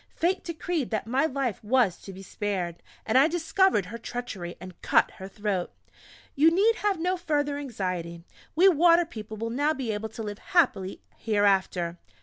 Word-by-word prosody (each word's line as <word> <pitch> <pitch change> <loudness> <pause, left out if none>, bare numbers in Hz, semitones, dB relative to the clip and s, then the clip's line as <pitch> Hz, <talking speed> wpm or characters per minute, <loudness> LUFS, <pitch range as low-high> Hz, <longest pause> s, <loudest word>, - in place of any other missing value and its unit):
Fate 365 +3 0
decreed 335 -4 -3
that 215 -2 -2
my 260 +7 +1
life 265 -8 -3
was 225 -4 +2
to 195 - -11
be 190 +1 -10
spared, 185 -4 -3 0.2
and 225 +4 +4
I 280 - +6
discovered 345 - +2
her 230 +5 -8
treachery, 220 -8 -6
and 185 0 -11
cut - - +3
her 190 - -9
throat. 195 -2 -3 0.6
You 305 +4 +6
need 410 +7 +3
have 405 -4 0
no 360 +3 0
further 290 -4 -1
anxiety; 180 -10 -4 0.3
we 360 +5 +6
Water 340 0 +5
people 220 -6 -8
will 230 +2 -3
now 290 +5 +1
be 255 -4 -3
able 215 +1 -4
to 225 +1 -7
live 205 -1 -6
happily 265 - +1 0.2
hereafter...." 195 -5 +1
230 Hz, 170 wpm, -27 LUFS, 195-315 Hz, 0.6 s, I